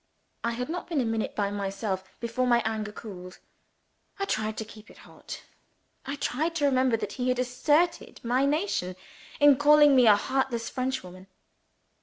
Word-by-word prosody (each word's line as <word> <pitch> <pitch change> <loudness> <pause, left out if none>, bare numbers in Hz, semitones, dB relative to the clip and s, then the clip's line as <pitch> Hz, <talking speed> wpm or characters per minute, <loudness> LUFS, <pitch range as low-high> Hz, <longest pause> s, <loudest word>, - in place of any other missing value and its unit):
I 235 0 0
had 250 +2 -3
not 350 +3 -5
been 325 -5 0
a 250 - +1
minute 225 -1 -2
by 200 -1 0
myself, 195 -1 -3 0.2
before 235 +2 -1
my 240 -1 +3
anger 215 -1 -2
cooled. 185 -4 -10 0.8
I 395 - -1
tried 220 - -2
to 220 - -4
keep 215 0 -14
it - - -16
hot; - - -10 0.6
I 280 - -2
tried 310 +5 -2
to 295 -3 +1
remember 260 -3 +3
that 205 -2 -5
he 250 0 -2
had 250 - +1
aspersed 290 +6 0
my 255 +4 +2
nation 290 - -1 0.4
in 290 -2 +7
calling 295 0 +6
me 250 -3 +6
a 210 - +8
"heartless 255 +1 -1
Frenchwoman." 195 -8 -4
245 Hz, 170 wpm, -27 LUFS, 215-280 Hz, 0.8 s, a